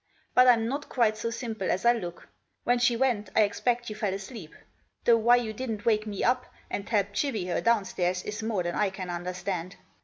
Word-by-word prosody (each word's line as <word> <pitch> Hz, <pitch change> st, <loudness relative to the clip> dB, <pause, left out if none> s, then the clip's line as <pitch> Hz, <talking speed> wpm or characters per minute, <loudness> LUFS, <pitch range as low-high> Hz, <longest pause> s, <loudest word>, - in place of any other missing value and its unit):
But 250 Hz, 0 st, +6 dB
I'm 230 Hz, -2 st, +5 dB
not 280 Hz, +4 st, -4 dB
quite 225 Hz, -4 st, +2 dB
so 220 Hz, +2 st, -3 dB
simple 230 Hz, -4 st, -4 dB
as 190 Hz, -, 0 dB
I 240 Hz, -, +7 dB
look. 175 Hz, -7 st, -6 dB, 0.4 s
When 245 Hz, 0 st, +2 dB
sfce 240 Hz, -1 st, +3 dB
went 230 Hz, -6 st, +1 dB
I -, -, +6 dB
ekpect 235 Hz, +4 st, -1 dB
you 215 Hz, -, -4 dB
fell 210 Hz, -3 st, -1 dB
asleep, 195 Hz, -4 st, -8 dB, 0.5 s
though 235 Hz, -1 st, +6 dB
why 235 Hz, +2 st, +5 dB
you 235 Hz, -3 st, -1 dB
didn't 220 Hz, -3 st, -4 dB
wake 215 Hz, -1 st, +2 dB
me 205 Hz, -2 st, -3 dB
up, 250 Hz, +1 st, +2 dB, 0.2 s
and 200 Hz, -, -4 dB
help 205 Hz, -3 st, +1 dB
chivy 220 Hz, -5 st, -1 dB
her -, -, 0 dB
downstairs, 190 Hz, -5 st, +1 dB
is 210 Hz, +1 st, -5 dB
more 220 Hz, -5 st, -1 dB
than 175 Hz, 0 st, -2 dB
I 210 Hz, -2 st, +1 dB
can 185 Hz, -2 st, -6 dB
understand. 180 Hz, +1 st, -4 dB
215 Hz, 210 wpm, -28 LUFS, 195-235 Hz, 0.5 s, I